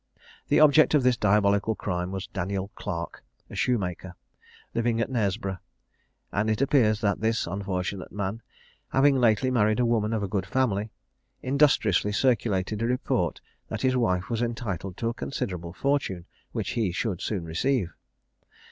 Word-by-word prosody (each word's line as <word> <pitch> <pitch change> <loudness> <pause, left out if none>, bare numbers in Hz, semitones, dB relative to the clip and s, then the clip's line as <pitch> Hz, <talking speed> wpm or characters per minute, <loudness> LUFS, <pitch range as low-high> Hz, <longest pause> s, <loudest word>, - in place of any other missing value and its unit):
The - - +4
object 155 +1 +6
of 145 - +3
this 125 -1 +4
diabolical 105 +1 +2
crime 90 -2 -3
was 95 0 -4
Daniel 100 0 -3
Clarke, 85 0 -5 0.3
a - - -7
shoemaker, 95 -6 -1 0.6
living 115 0 +1
at 115 - -1
Knaresborough; 100 -4 -1 0.7
and 105 +2 0
it 110 0 +1
appears 125 -7 +3
that 100 -2 0
this 110 +1 +1
unfortunate 95 0 -3
man, 100 +2 -3 0.5
having 135 +1 +4
lately 120 0 +3
married 110 -2 +2
a 125 - +3
woman 115 -2 +1
of 110 -2 -1
a - - -1
good 95 -1 -2
family, 110 -5 0 0.5
industriously 130 - +3
circulated 110 -4 +1
a 115 - +1
report 125 +1 -1 0.3
that - - -5
his 130 0 +3
wife 90 -7 +1
was 115 -1 -2
entitled 100 -6 -3
to 115 - -1
a - - -3
considerable 90 -10 -4
fortune, 100 -7 -1 0.3
which - - -3
he 110 -6 0
should 95 0 -2
soon 95 -6 -2
receive. 90 +2 0
105 Hz, 155 wpm, -26 LUFS, 95-120 Hz, 0.7 s, object